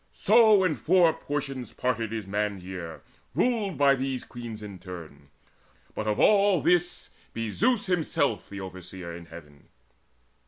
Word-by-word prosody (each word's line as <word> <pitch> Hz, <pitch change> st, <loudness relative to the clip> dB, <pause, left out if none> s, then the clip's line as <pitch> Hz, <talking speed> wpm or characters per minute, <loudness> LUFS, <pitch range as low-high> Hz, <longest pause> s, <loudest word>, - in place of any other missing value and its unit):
So 215 Hz, -2 st, +5 dB
in 170 Hz, -5 st, +1 dB
four 170 Hz, -1 st, +4 dB
portions 140 Hz, -3 st, -4 dB
parted 115 Hz, -3 st, -1 dB
is 110 Hz, -3 st, -4 dB
man's 100 Hz, -1 st, -2 dB
year 90 Hz, -3 st, -7 dB, 0.3 s
Ruled 215 Hz, -, +1 dB
by 140 Hz, 0 st, +5 dB
these 135 Hz, -1 st, -2 dB
Queens 115 Hz, -3 st, -8 dB
in 100 Hz, -3 st, -8 dB
turn 80 Hz, -6 st, -10 dB, 0.6 s
but 110 Hz, -, -4 dB
of 105 Hz, -, 0 dB
all 200 Hz, -3 st, +5 dB
this 175 Hz, +1 st, +1 dB, 0.2 s
Be 115 Hz, -2 st, -3 dB
Zeus 235 Hz, -, +2 dB
himself 180 Hz, -4 st, 0 dB
the 100 Hz, -1 st, -7 dB
Overseer 90 Hz, -2 st, -8 dB
in 85 Hz, 0 st, -10 dB
heaven. 75 Hz, -4 st, -13 dB
115 Hz, 145 wpm, -27 LUFS, -, 0.6 s, So